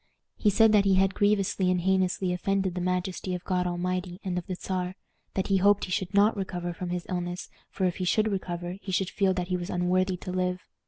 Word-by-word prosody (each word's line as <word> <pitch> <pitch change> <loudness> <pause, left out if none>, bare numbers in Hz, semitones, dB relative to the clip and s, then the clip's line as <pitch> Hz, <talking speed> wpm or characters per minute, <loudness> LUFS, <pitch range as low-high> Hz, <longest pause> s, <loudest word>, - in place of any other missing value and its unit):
He 210 - +2
said 220 +2 +5
that 210 -2 +5
he 195 -1 +4
had 190 0 +3
grievously 200 -2 +2
and 180 -1 +2
heinously 185 0 +1
offended 190 +1 0
the 180 - -3
majesty 180 0 -1
of 180 - -6
God 180 -1 0
Almighty 180 +1 -2
and 185 -3 -2
of 180 -1 -3
the 185 - -3
Czar; 180 0 -3 0.4
that 190 - 0
he 195 - +4
hoped 200 +1 +4
he 185 - -9
should 185 0 -1
not 205 +2 +4
recover 180 -3 -3
from 175 +1 -5
his 175 0 -3
illness, 175 0 -4 0.2
for 190 - -1
if 180 - 0
he 185 - -2
should 215 +4 +2
recover 175 -2 -3
he 190 - -6
should 185 0 0
feel 195 -2 +2
that 180 0 -3
he 180 - +1
was 175 +1 -5
unworthy 180 +1 +1
to 180 - -6
live. 180 0 -1
185 Hz, 230 wpm, -28 LUFS, 180-195 Hz, 0.4 s, said